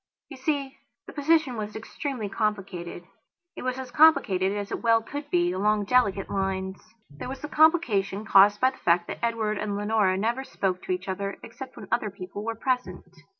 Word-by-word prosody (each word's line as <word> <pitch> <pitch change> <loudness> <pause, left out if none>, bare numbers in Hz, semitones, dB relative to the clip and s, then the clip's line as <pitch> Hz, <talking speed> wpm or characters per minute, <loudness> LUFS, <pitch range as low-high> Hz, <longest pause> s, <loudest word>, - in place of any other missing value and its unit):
You 275 - -9
see, 275 0 -2 0.3
the - - -11
position 295 -4 +2
was 210 -1 -5
extremely 225 +1 -4
complicated. 195 -5 -3 0.5
It - - -7
was 255 0 -2
as 260 -1 -7
complicated 195 -12 +4
as 205 0 -4
it - - -3
well 230 -1 +3
could 290 +4 -7
be, 175 0 +2
along 205 +2 +1
delicate 200 -5 +2
lines. 190 -1 -2 0.3
There 145 - -7
was 265 0 -7
the 300 - -4
complication 230 - +2
caused 205 +1 +6
by 260 0 +4
the 260 - -16
fact 170 0 +2
that - - -6
Edward 220 -3 0
and 205 -1 -2
Leonora 205 -2 +2
never 235 +6 -1
spoke 185 -7 -2
to - - -3
each 185 +1 -2
other 195 +1 -3
except 265 -1 -10
when - - -9
other 215 -3 +1
people 200 +1 -8
were 230 +1 -3
present. 250 -5 -2
210 Hz, 190 wpm, -26 LUFS, 195-255 Hz, 0.5 s, caused